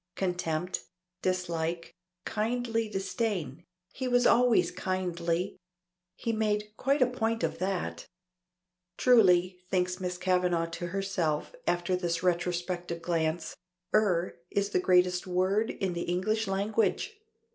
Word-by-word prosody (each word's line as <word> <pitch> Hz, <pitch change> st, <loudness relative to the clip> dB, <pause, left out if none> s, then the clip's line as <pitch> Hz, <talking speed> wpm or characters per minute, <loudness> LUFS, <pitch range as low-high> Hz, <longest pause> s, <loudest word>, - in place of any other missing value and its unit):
Contempt, 180 Hz, -1 st, -1 dB, 0.4 s
dislike, 170 Hz, -2 st, -2 dB, 0.3 s
kindly 230 Hz, 0 st, -1 dB
disdain 195 Hz, -, -2 dB, 0.3 s
he 260 Hz, -, -3 dB
was 245 Hz, -1 st, +3 dB
always 245 Hz, -1 st, +4 dB
kindly 180 Hz, -1 st, -2 dB, 0.6 s
he 230 Hz, -, -2 dB
made 210 Hz, -1 st, 0 dB
quite 275 Hz, +3 st, +2 dB
a -, -, +5 dB
point 230 Hz, -2 st, -1 dB
of -, -, -1 dB
that. 180 Hz, -, -2 dB, 0.9 s
Truly, 185 Hz, -7 st, +5 dB
thinks 180 Hz, 0 st, 0 dB
Miss 180 Hz, -1 st, -3 dB
Kavanagh 180 Hz, -2 st, +1 dB
to 175 Hz, +1 st, -4 dB
herself 180 Hz, -, -1 dB
after 175 Hz, +1 st, +1 dB
this 175 Hz, -1 st, -1 dB
retrospective 175 Hz, -1 st, -1 dB
glance, 165 Hz, -1 st, -1 dB, 0.4 s
"er" 185 Hz, -6 st, +2 dB
is 200 Hz, 0 st, 0 dB
the -, -, +2 dB
greatest 180 Hz, 0 st, +3 dB
word 190 Hz, +5 st, +1 dB
in 190 Hz, -2 st, -2 dB
the 170 Hz, -, -3 dB
English 215 Hz, +5 st, 0 dB
language! 215 Hz, -, 0 dB
185 Hz, 115 wpm, -29 LUFS, 175-215 Hz, 0.9 s, a